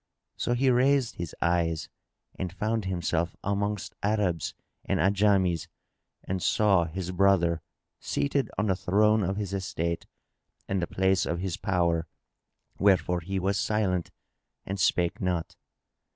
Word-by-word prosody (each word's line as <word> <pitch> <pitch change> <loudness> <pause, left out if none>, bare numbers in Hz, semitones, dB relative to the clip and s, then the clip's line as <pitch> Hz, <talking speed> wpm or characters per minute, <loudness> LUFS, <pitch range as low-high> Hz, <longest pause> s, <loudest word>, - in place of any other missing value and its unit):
So 120 - -1
he 130 +1 +3
raised 130 0 +2
his 85 -3 -5
eyes 85 -2 +1 0.5
and 90 -2 -4
found 105 +3 -1
himself 85 -2 -1
amongst 100 0 -2
Arabs 100 -6 0 0.3
and 95 - 0
Ajams 95 -2 +2 0.6
and 95 0 -3
saw 95 -4 +3
his 90 +2 -4
brother 90 -3 +3 0.4
seated 140 -3 -1
on 105 - +1
the 95 -3 +2
throne 105 +4 +3
of 95 +1 -1
his 100 -2 -3
estate 85 -3 -2 0.6
and 95 -1 0
the 85 - -1
place 95 0 +1
of 85 - -1
his 90 -1 -2
power, 85 -3 0 0.7
wherefore 95 -3 +3
he 95 +3 -4
was 95 +1 0
silent 95 -5 0 0.6
and 95 +1 -4
spake 85 -1 +1
not. 90 -3 -1
95 Hz, 135 wpm, -28 LUFS, 85-100 Hz, 0.7 s, he